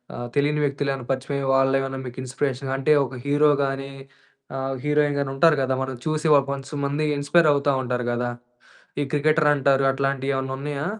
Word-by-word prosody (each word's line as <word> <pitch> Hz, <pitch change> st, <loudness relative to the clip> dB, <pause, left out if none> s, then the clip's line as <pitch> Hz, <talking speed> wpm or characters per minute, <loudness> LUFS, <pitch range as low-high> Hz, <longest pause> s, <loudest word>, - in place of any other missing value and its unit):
ఆహ్, 120 Hz, 0 st, -5 dB
తెలియని 150 Hz, +1 st, +1 dB
వ్యక్తులేవన్నా 140 Hz, -2 st, -2 dB
పరిచయమయ్యి, 135 Hz, +1 st, -2 dB
వాళ్ళేవన్నా 135 Hz, 0 st, +1 dB
మీకు 125 Hz, 0 st, -8 dB
ఇన్‌స్పిరేషన్‌గా 135 Hz, +1 st, -3 dB
అంటే, 150 Hz, +3 st, +3 dB
ఒక 135 Hz, -, -9 dB
హీరో 145 Hz, +1 st, +4 dB
గానీ, 135 Hz, 0 st, -4 dB, 0.9 s
హీరోయిన్‌ 150 Hz, -1 st, +2 dB
గానీ 140 Hz, -1 st, -1 dB
ఉంటారు 160 Hz, +3 st, +5 dB
గదా 130 Hz, 0 st, 0 dB
మనం 130 Hz, -1 st, -5 dB
చూసి 155 Hz, +1 st, 0 dB
ఒక 140 Hz, -, +1 dB
వన్స్ 135 Hz, +1 st, -10 dB
మంది 145 Hz, +2 st, -1 dB
ఇన్‌స్పైరవుతా 145 Hz, -1 st, +3 dB
ఉంటారు 125 Hz, -1 st, -2 dB
గదా! 120 Hz, 0 st, -2 dB, 0.7 s
ఈ -, -, +2 dB
క్రికెటరటారు, 145 Hz, -2 st, +3 dB
అట్లాంటియేవన్నున్నయా? 135 Hz, +1 st, -2 dB
140 Hz, 140 wpm, -23 LUFS, 135-145 Hz, 0.9 s, ఉంటారు